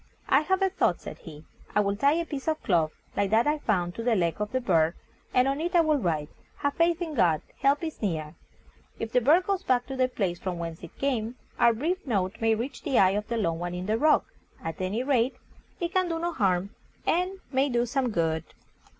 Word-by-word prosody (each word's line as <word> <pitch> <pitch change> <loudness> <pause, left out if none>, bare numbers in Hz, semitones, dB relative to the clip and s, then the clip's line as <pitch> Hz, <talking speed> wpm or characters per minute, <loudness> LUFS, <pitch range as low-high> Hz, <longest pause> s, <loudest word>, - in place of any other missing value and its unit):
"I - - +5
have 380 +4 +1
a 385 - +2
thought," 385 - +1
said - - -9
he; 155 -1 -11 0.3
"I - - +5
will 200 0 0
tie 280 +7 +3
a 335 +1 0
piece 285 -3 -6
of 315 -1 0
cloth, 165 -5 +2 0.2
like 200 -1 +1
that 220 +3 +4
I 300 +1 +1
found, 180 -9 0
to 230 - -5
the 235 -1 +2
leg 170 0 0
of 210 - -2
the 260 - +1
bird, 170 -8 +2 0.4
and 250 +1 +3
on 275 +2 0
it 350 +2 -2
I 345 - +7
will 310 -3 +2
write, 155 - -1 0.3
'Have 285 0 0
faith 335 +2 +2
in 320 -2 -5
God: 170 - +2 0.2
help 280 +3 +2
is 320 -1 -5
near.' 160 -7 -2 0.6
If 225 - -4
the 250 - +3
bird 320 +9 +4
goes 395 -2 0
back 250 -8 +1
to 270 - -6
the 255 -1 +2
place 190 -8 -2
from 185 -2 -3
whence 165 -1 -5
it - - -11
came, 245 -4 -1 0.2
our 235 - +6
brief 330 - -2
note 195 -5 -1
may 225 0 +3
reach 240 +6 -5
the 275 -6 0
eye 190 -1 +6
of 210 +1 -2
the 235 0 -2
lone 165 -6 0
one 175 0 -3
in 180 +1 -4
the 215 +3 0
rock. 305 +2 +4 0.4
At 165 +2 -5
any 200 +6 -1
rate, 260 -2 +2 0.4
it 345 -1 -2
can 370 -1 +2
do 330 - -1
no 340 +1 -2
harm, 195 - +1 0.3
and 365 +3 +1
may 270 +1 +2
do 240 -1 +1
some 255 +1 0
good." 165 -5 0
235 Hz, 235 wpm, -27 LUFS, 185-295 Hz, 0.6 s, I